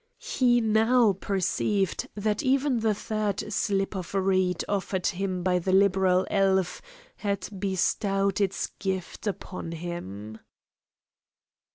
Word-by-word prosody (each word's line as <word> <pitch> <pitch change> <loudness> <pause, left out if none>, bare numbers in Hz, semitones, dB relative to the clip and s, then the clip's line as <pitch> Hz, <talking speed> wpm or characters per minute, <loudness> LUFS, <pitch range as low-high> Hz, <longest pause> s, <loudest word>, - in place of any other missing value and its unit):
He 250 - +2
now 225 0 +4
perceived 195 +1 -1
that 210 0 0
even 265 -1 +2
the 220 -1 +1
third 210 0 -2
slip 195 -1 0
of 185 +1 -5
reed 185 -2 +1
offered 190 -2 -2
him 185 -2 -1
by 180 -1 +2
the 185 +2 -1
liberal 190 -1 +4
elf 190 -2 +2 0.4
had 200 -2 -2
bestowed 195 +1 0
its 195 -2 -1
gift 190 +2 -3
upon 185 -3 -5
him. 110 - -6
195 Hz, 110 wpm, -27 LUFS, 185-210 Hz, 0.4 s, now